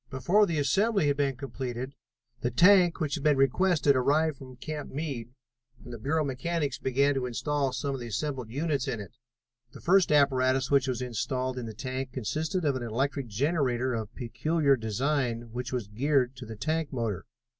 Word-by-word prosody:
Before 180 Hz, +11 st, +3 dB
the 165 Hz, -3 st, -1 dB
assembly 195 Hz, -, +2 dB
had 145 Hz, -1 st, +2 dB
been 140 Hz, -2 st, +1 dB
completed 130 Hz, -1 st, -5 dB, 0.5 s
the 120 Hz, -, 0 dB
tank 175 Hz, +7 st, +5 dB
which 155 Hz, -4 st, -1 dB
had 150 Hz, -, -3 dB
been 150 Hz, -2 st, +4 dB
requested 145 Hz, +1 st, +3 dB
arrived 150 Hz, +4 st, +2 dB
from 130 Hz, -1 st, -11 dB
Camp 150 Hz, +3 st, -6 dB
Meade, 135 Hz, -6 st, -4 dB, 0.5 s
and 120 Hz, -, -9 dB
the 115 Hz, -, -7 dB
Bureau 155 Hz, +7 st, 0 dB
mechanics 145 Hz, +1 st, -2 dB
began 140 Hz, +2 st, +2 dB
to 130 Hz, -2 st, -1 dB
install 135 Hz, +4 st, -1 dB
some 140 Hz, +2 st, -2 dB
of 135 Hz, -, -5 dB
the 120 Hz, -, -5 dB
assembled 130 Hz, 0 st, -3 dB
units 140 Hz, +1 st, -1 dB
in 115 Hz, -, -2 dB
it. 100 Hz, -, -8 dB, 0.6 s
The -, -, -10 dB
first 185 Hz, 0 st, +4 dB
apparatus 130 Hz, -3 st, +3 dB
which 140 Hz, -1 st, +4 dB
was 125 Hz, -1 st, -1 dB
installed 125 Hz, +2 st, -2 dB
in 120 Hz, -, -5 dB
the 110 Hz, -, -7 dB
tank 130 Hz, +2 st, -4 dB
consisted 155 Hz, -, -2 dB
of 140 Hz, -2 st, +2 dB
an 130 Hz, -, -3 dB
electric 130 Hz, +3 st, -2 dB
generator 130 Hz, +1 st, 0 dB
of 110 Hz, -1 st, -4 dB
peculiar 145 Hz, +4 st, +1 dB
design 120 Hz, +1 st, -1 dB
which 125 Hz, +2 st, -4 dB
was 125 Hz, -5 st, -2 dB
geared 130 Hz, +4 st, +1 dB
to 125 Hz, -2 st, -8 dB
the 110 Hz, -, -7 dB
tank 155 Hz, +6 st, -1 dB
motor. 115 Hz, -8 st, -3 dB
135 Hz, 185 wpm, -28 LUFS, 125-150 Hz, 0.6 s, tank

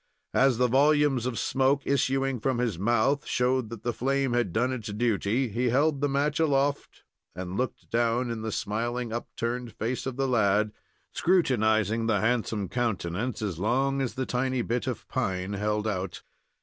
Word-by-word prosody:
As 135 Hz, -3 st, +4 dB
the 125 Hz, +1 st, +3 dB
volumes 140 Hz, -1 st, +3 dB
of 125 Hz, -3 st, -3 dB
smoke 135 Hz, +4 st, +1 dB
issuing 135 Hz, -1 st, +1 dB
from 130 Hz, +3 st, 0 dB
his 115 Hz, -8 st, -1 dB
mouth 120 Hz, +7 st, +2 dB
showed 125 Hz, -2 st, +1 dB
that 115 Hz, -2 st, -8 dB
the 120 Hz, -, -1 dB
flame 135 Hz, +1 st, 0 dB
had 120 Hz, -6 st, +1 dB
done 125 Hz, +7 st, +1 dB
its 115 Hz, -5 st, -5 dB
duty, 110 Hz, +3 st, 0 dB
he 120 Hz, +4 st, 0 dB
held 140 Hz, +3 st, +2 dB
the 145 Hz, -, +2 dB
match 145 Hz, +2 st, 0 dB
aloft, 145 Hz, -2 st, 0 dB, 0.3 s
and 90 Hz, +1 st, -5 dB
looked 125 Hz, +2 st, -3 dB
down 120 Hz, +1 st, +1 dB
in 115 Hz, -1 st, -4 dB
the 110 Hz, 0 st, -3 dB
smiling, 115 Hz, +3 st, -2 dB
upturned 120 Hz, 0 st, -4 dB
face 120 Hz, +4 st, -3 dB
of 130 Hz, -, -3 dB
the 135 Hz, +1 st, 0 dB
lad, 105 Hz, -3 st, +2 dB, 0.4 s
scrutinizing 115 Hz, -, +2 dB
the 105 Hz, -3 st, +2 dB
handsome 110 Hz, -2 st, 0 dB
countenance, 110 Hz, +1 st, -2 dB
as 95 Hz, -6 st, -3 dB
long 135 Hz, +6 st, +1 dB
as 130 Hz, -, -2 dB
the 130 Hz, -, -2 dB
tiny 130 Hz, 0 st, -1 dB
bit 120 Hz, -1 st, -2 dB
of -, -, -4 dB
pine 95 Hz, +1 st, -2 dB
held 105 Hz, +1 st, -1 dB
out. 95 Hz, -3 st, -3 dB
120 Hz, 170 wpm, -27 LUFS, 110-130 Hz, 0.4 s, As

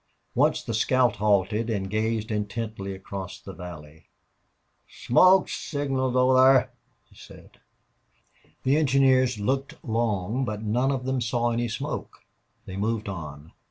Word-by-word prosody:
Once -, -, +2 dB
the 115 Hz, -, -4 dB
scout 125 Hz, +3 st, +2 dB
halted 105 Hz, +2 st, +1 dB
and 95 Hz, -3 st, -2 dB
gazed 110 Hz, +1 st, -1 dB
intently 105 Hz, -2 st, -4 dB
across 95 Hz, 0 st, -7 dB
the -, -, -10 dB
valley. 80 Hz, -3 st, -11 dB, 0.8 s
"Smoke 185 Hz, +9 st, +4 dB
signals 135 Hz, -3 st, -2 dB
over 130 Hz, +1 st, +4 dB
thar," 130 Hz, 0 st, +5 dB, 0.3 s
he -, -, -25 dB
said. -, -, -15 dB, 1.0 s
The 135 Hz, +3 st, +3 dB
engineers 130 Hz, -4 st, +3 dB
looked 135 Hz, +8 st, -1 dB
long, 110 Hz, 0 st, -1 dB
but 110 Hz, -3 st, -4 dB
none 120 Hz, +6 st, +1 dB
of 130 Hz, -2 st, -3 dB
them 130 Hz, -1 st, -1 dB
saw 120 Hz, +1 st, 0 dB
any 120 Hz, +1 st, -1 dB
smoke. 110 Hz, -, -5 dB, 0.4 s
They 95 Hz, -, -7 dB
moved 110 Hz, +1 st, -2 dB
on. 75 Hz, -4 st, -8 dB
115 Hz, 130 wpm, -25 LUFS, 100-130 Hz, 1.0 s, thar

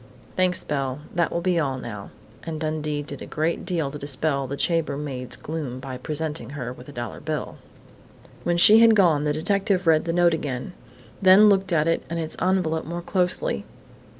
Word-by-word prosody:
"Thanks, 185 Hz, -1 st, +1 dB
Belle. 135 Hz, -1 st, -2 dB
That 170 Hz, -1 st, +1 dB
will 170 Hz, -, -1 dB
be 180 Hz, -1 st, +1 dB
all 135 Hz, -4 st, -1 dB
now," 105 Hz, -5 st, -7 dB, 0.3 s
and 160 Hz, -2 st, -5 dB
Dundee 155 Hz, -1 st, -2 dB
did -, -, -5 dB
a -, -, -7 dB
great 160 Hz, +4 st, -1 dB
deal 165 Hz, -6 st, -1 dB
to 150 Hz, -, -7 dB
dispel 140 Hz, 0 st, -1 dB
the 140 Hz, +2 st, -5 dB
chambermaid's 145 Hz, -6 st, -1 dB
gloom 145 Hz, -5 st, -5 dB
by 130 Hz, -1 st, -7 dB
presenting 155 Hz, +2 st, -4 dB
her 125 Hz, -2 st, -4 dB
with 125 Hz, +2 st, -13 dB
a -, -, -8 dB
dollar 120 Hz, -4 st, -6 dB
bill. 155 Hz, -1 st, -4 dB, 0.8 s
When 175 Hz, 0 st, 0 dB
she 215 Hz, +5 st, +8 dB
had 225 Hz, -1 st, +7 dB
gone, 165 Hz, -7 st, +4 dB
the 150 Hz, -, +1 dB
detective 190 Hz, +3 st, 0 dB
read 160 Hz, -1 st, +4 dB
the 165 Hz, -, 0 dB
note 175 Hz, -1 st, +4 dB
again, 145 Hz, 0 st, -4 dB, 0.5 s
then 195 Hz, +3 st, +7 dB
looked 195 Hz, -2 st, +2 dB
at 155 Hz, -2 st, +2 dB
it 165 Hz, -, +1 dB
and 170 Hz, -, -3 dB
its 160 Hz, -1 st, -3 dB
envelope 180 Hz, -4 st, +1 dB
more 170 Hz, +2 st, -5 dB
closely. 185 Hz, -, -1 dB
160 Hz, 185 wpm, -24 LUFS, 140-175 Hz, 0.8 s, she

